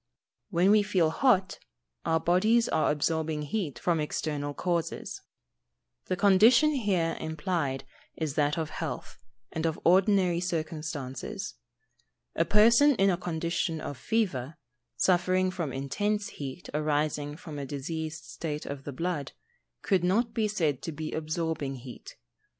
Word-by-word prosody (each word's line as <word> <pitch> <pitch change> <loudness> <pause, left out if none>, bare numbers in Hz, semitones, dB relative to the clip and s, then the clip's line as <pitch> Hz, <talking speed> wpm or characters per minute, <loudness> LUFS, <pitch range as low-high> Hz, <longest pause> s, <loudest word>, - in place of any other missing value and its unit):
_ - - -55 0.5
When 185 +1 +3
we 210 0 +6
feel 185 -6 +2
hot, 195 -3 +2 0.5
our 160 0 +2
bodies 215 +8 +3
are 155 - +2
absorbing 155 0 -1
heat 150 - -3
from 170 -2 +1
external 145 -1 -2
causes. 170 -2 -2 0.8
The - - -1
condition 220 - +6
here 195 - 0
implied 160 -3 -2 0.3
is 155 -3 -2
that 150 +2 +1
of 160 -2 -2
health, - - -5 0.3
and 160 +1 -1
of 160 - -2
ordinary 185 -1 +4
circumstances. 155 0 -4 0.8
A 165 - +2
person 235 - +6
in 195 -2 +4
a - - +2
condition 170 -1 -2
of 145 - -5
fever, 155 - -1 0.4
suffering 185 0 +2
from 170 -6 -3
intense 205 +11 -1
heat 140 +4 -7
arising 150 -1 -1
from 155 -4 -8
a 140 - -4
diseased 155 +3 -4
state 150 -2 -5
of 140 -1 -6
the 145 - -4
blood, 150 0 -3 0.5
could 190 -4 +2
not 220 +6 +2
be 220 -2 +1
said 160 -10 0
to 165 - -4
be 155 +1 -5
absorbing 155 -3 -2
heat. 125 -1 -10
165 Hz, 140 wpm, -29 LUFS, 150-190 Hz, 0.8 s, we